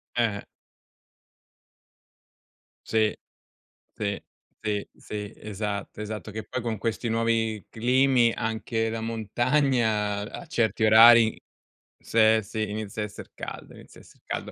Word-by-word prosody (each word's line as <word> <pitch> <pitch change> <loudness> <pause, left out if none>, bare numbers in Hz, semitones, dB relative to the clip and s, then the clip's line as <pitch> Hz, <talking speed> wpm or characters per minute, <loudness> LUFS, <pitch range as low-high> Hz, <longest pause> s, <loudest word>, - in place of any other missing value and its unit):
Eh, 115 -4 +1
eh. - - -7 2.4
Sì, 110 -1 +2 0.8
sì, 100 -1 -3 0.4
sì, 105 -2 -2
sì, 105 -1 -7
esatto, 105 0 -5
esatto, 105 0 -6
che 110 +1 -5
poi 130 - -3
con 115 -2 -2
questi 115 +1 -2
nuovi 115 -2 0
climi 125 0 +3
anche 110 0 -2
la 115 0 -3
montagna 115 -2 +1
a 175 - -8
certi 115 -6 +1
orari, 115 +1 +7 0.6
se 110 0 +4
sì, 110 +1 -4
inizia 105 0 -4
a - - -1
esser 105 - -11
caldo, - - -8
inizia - - -15
a - - -16
esser - - -21
caldo. - - -5
110 Hz, 125 wpm, -26 LUFS, 105-115 Hz, 2.4 s, orari